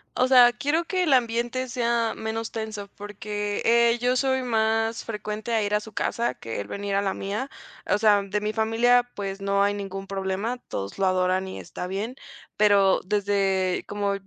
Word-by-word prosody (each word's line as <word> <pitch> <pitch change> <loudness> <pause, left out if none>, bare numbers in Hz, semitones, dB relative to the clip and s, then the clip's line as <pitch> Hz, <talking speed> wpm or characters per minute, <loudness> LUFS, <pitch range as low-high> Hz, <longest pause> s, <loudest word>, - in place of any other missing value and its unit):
O 255 0 +3
sea, 250 -2 +7
quiero 290 +7 0
que 370 -1 -1
el 300 -5 +3
ambiente 240 +1 +1
sea 235 -1 0
menos 220 +1 -4
tenso 215 -2 -5
porque, 205 0 -4
eh, 235 0 +4
yo 250 +1 +1
soy 260 0 +1
más 225 -1 0
frecuente 215 +1 -5
a 220 -2 +2
ir 205 0 -2
a 210 - +3
su 220 +1 -11
casa 235 +3 -1
que 115 -2 -6
él 100 - -8
venir 200 0 -4
a 200 - +2
la 195 -1 -1
mía. 210 +8 -4 0.4
O - - +4
sea, 210 -1 +4
de 200 +1 -2
mi 210 +1 -2
familia, 240 +2 +3
pues 195 -1 -5
no 200 0 +2
hay 205 0 +2
ningún 195 -1 -5
problema. 195 +5 -2
Todos 100 - -5
lo 190 - +3
adoran 185 0 +1
y 190 - -7
está 180 - -7
bien, 205 +6 -3 0.4
pero 200 -2 +4
desde 195 -2 0
como 205 -1 -1
210 Hz, 190 wpm, -25 LUFS, 200-235 Hz, 0.4 s, sea